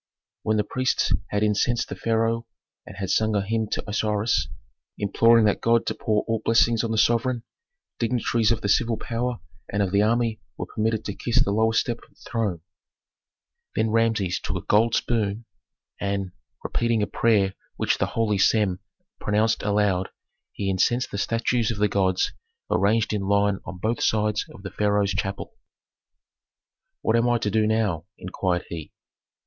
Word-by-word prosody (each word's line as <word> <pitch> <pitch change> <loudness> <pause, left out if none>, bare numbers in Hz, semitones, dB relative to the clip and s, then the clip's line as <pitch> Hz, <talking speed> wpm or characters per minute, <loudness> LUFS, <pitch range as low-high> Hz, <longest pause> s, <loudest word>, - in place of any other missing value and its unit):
When 110 0 +1
the 105 - +2
priests 130 +5 0 0.2
had 105 +1 0
incensed 110 +3 +1
the - - -4
pharaoh 115 0 0 0.4
and 100 - -10
had 95 -2 -2
sung 110 -1 +2
a 100 -1 0
hymn 110 +1 -1
to - - -3
Osiris, 105 +1 0 0.5
imploring 115 +3 +4
that 105 - +1
god 115 0 +3
to - - -1
pour 105 -1 0
all 115 -1 -2
blessings 115 0 +3
on 115 - -1
the 110 - -1
sovereign, 120 +2 +2 0.6
dignitaries 115 -1 +1
of 115 - 0
the - - -2
civil 115 +2 +2
power 120 +2 -3 0.3
and 100 0 +1
of 95 - -2
the 100 +1 +3
army 115 +1 +1 0.2
were - - -3
permitted 110 0 -1
to 100 - -3
kiss 120 +3 +1
the 100 - 0
lowest 110 +1 +3
step 120 -1 -3
of - - -20
the - - -15
throne. 105 -8 -1 1.1
Then 110 0 +1
Rameses 110 -5 +1
took - - -4
a - - -5
gold 110 +2 +3
spoon, 110 -1 -1 0.5
and, 100 -2 -2 0.3
repeating 115 -2 0
a - - +2
prayer 105 -4 +2 0.2
which - - 0
the - - +1
holy 105 -3 0
Sem 95 -3 +3 0.4
pronounced 110 +2 +1
aloud, 100 -3 +1 0.4
he 100 - -4
incensed 120 +7 +1
the 100 - -3
statues 115 +1 0
of 115 - -2
the 105 +1 +3
gods 95 -2 +1 0.4
arranged 110 +3 +2
in 105 - -1
line 100 0 +2
on 90 - -7
both 110 +5 -1
sides 105 -1 +1
of 95 - -13
the 95 - -6
pharaoh's 105 -1 +1
chapel. 95 0 -3 1.5
"What 110 - +2
am 115 +1 +3
I 120 - +3
to 105 -2 -2
do 110 +1 +2
now?" 105 -8 0
inquired 90 -1 -2
he. 80 -3 -7
110 Hz, 170 wpm, -24 LUFS, 100-115 Hz, 1.5 s, imploring